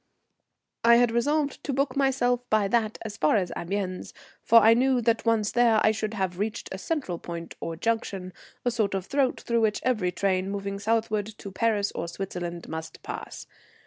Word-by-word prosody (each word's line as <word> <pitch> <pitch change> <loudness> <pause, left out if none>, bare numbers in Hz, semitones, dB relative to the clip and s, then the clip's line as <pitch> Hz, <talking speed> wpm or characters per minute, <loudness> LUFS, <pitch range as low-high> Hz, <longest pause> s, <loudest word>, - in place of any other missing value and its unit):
I 235 0 +7
had 240 -1 +4
resolved 285 +5 0
to 280 - -2
book 270 0 0
myself 265 -3 +2
by 215 -2 +3
that 220 -1 +1
as 210 -2 -6
far 155 -1 +3
as 185 -4 0
Amiens, 185 +1 -4 0.3
for 230 0 +6
I 225 +1 +7
knew 255 +2 +3
that, 230 0 +1
once 220 -2 +2
there, 235 -2 +4
I 215 - +6
should 220 0 -3
have 190 -3 -2
reached 215 +2 -3
a 190 - -5
central 195 - -3
point 170 -1 -7
or 165 - -4
junction, 195 -2 -2 0.3
a 245 - +2
sort 215 -4 0
of 190 -2 -3
throat 275 0 0
through 235 -1 0
which 215 -1 +1
every 215 -8 +1
train 185 +1 0
moving 200 0 -4
southward 215 -1 0
to 210 -2 -9
Paris 205 0 +1
or - - -4
Switzerland 175 -1 -5
must 160 0 -7
pass. - - -7
215 Hz, 185 wpm, -26 LUFS, 190-235 Hz, 0.3 s, I